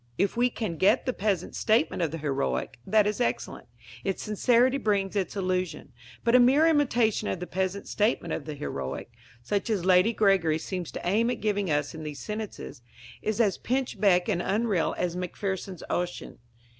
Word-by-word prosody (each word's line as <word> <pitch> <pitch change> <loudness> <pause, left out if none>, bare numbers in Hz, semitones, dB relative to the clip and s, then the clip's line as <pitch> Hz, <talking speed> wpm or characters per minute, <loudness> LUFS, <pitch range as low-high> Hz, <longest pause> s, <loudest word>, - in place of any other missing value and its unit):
If 200 - +1
we 245 +1 +3
can 215 -9 -4
get 205 +8 +3
the 255 - 0
peasant 195 -5 -1
statement 215 -6 +1
of 165 - +1
the 165 - -5
heroic, 140 -3 -2
that 215 -1 +4
is 210 +4 -1
excellent; - - -2 0.4
its 195 -1 -2
sincerity 245 +5 +3
brings 200 -3 0
its 195 -2 -1
illusion. 185 -6 -2 0.3
But 235 - +2
a 250 - +8
mere 265 +6 +5
imitation 245 -9 +2
of - - -2
the 180 - -4
peasant 190 +2 -2
statement 210 -6 0
of 145 - -4
the 155 -1 -5
heroic, 70 - -5 0.3
such 205 - -1
as 200 -5 0
Lady 185 +4 +5
Gregory 195 -8 +3
seems 180 0 -5
to - - -5
aim 220 +6 +2
at 245 - -2
giving 205 -3 0
us 145 -1 0
in 160 - -8
these 150 -2 -6
sentences, 210 - -6 0.4
is 215 +1 -2
as 210 -5 +2
pinchbeck 205 -8 +1
and 175 - 0
unreal 205 -3 0
as 175 -1 -1
Macpherson's 185 +1 -4
Ossian. 175 0 -3
195 Hz, 180 wpm, -27 LUFS, 175-220 Hz, 0.4 s, a